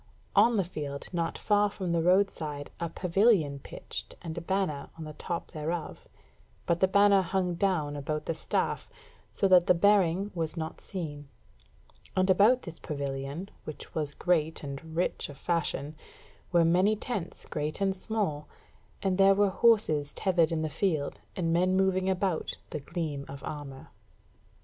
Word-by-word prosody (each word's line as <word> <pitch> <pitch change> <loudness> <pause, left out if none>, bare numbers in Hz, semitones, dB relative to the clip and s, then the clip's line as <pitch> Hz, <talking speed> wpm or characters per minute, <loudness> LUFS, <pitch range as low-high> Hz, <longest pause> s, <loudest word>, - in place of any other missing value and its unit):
on 235 -1 +5
the 195 - +3
field 145 -5 -5
not 170 -1 -1
far 205 -1 +3
from 190 -3 -4
the 170 -1 +2
roadside 165 -5 +1
a 170 - -2
pavilion 180 -6 +2
pitched - - -7
and 160 -2 -5
a 170 - -4
banner 185 -5 -1
on 160 - -6
the 155 0 -7
top 170 +3 -5
thereof, 160 +2 -4 0.6
but 170 0 +1
the 190 - +4
banner 200 0 +5
hung 185 0 0
down 170 -5 0
about 150 +1 -3
the - - -1
staff, 160 - -2 0.4
so 195 - +1
that 180 -1 +6
the 180 - +6
bearing 195 0 +3
was 165 -1 -2
not 160 0 -5
seen: 145 -6 -6 0.9
and 185 +1 +4
about 215 +7 +5
this 170 -2 -9
pavilion, 140 +4 -4 0.2
which 155 - -8
was 150 -2 -2
great 160 -4 +1
and 145 +3 -7
rich 175 -2 -1
of 145 - -10
fashion, 155 -2 -1 0.6
were 170 -1 +5
many 185 +6 +4
tents 205 -5 -5
great 150 +1 -3
and 195 -1 +1
small, 190 -8 -2 0.6
and 190 -1 +1
there 195 0 +7
were 200 -1 +3
horses 185 -11 +3
tethered 175 -4 +2
in 160 -1 0
the - - 0
field, 155 -1 -1 0.2
and 165 -3 0
men 185 +2 +3
moving 190 0 +2
about 185 -3 -1
the 150 - -3
gleam 150 -2 -4
of 140 0 -9
armour. 140 -3 -7
170 Hz, 160 wpm, -29 LUFS, 155-190 Hz, 0.9 s, there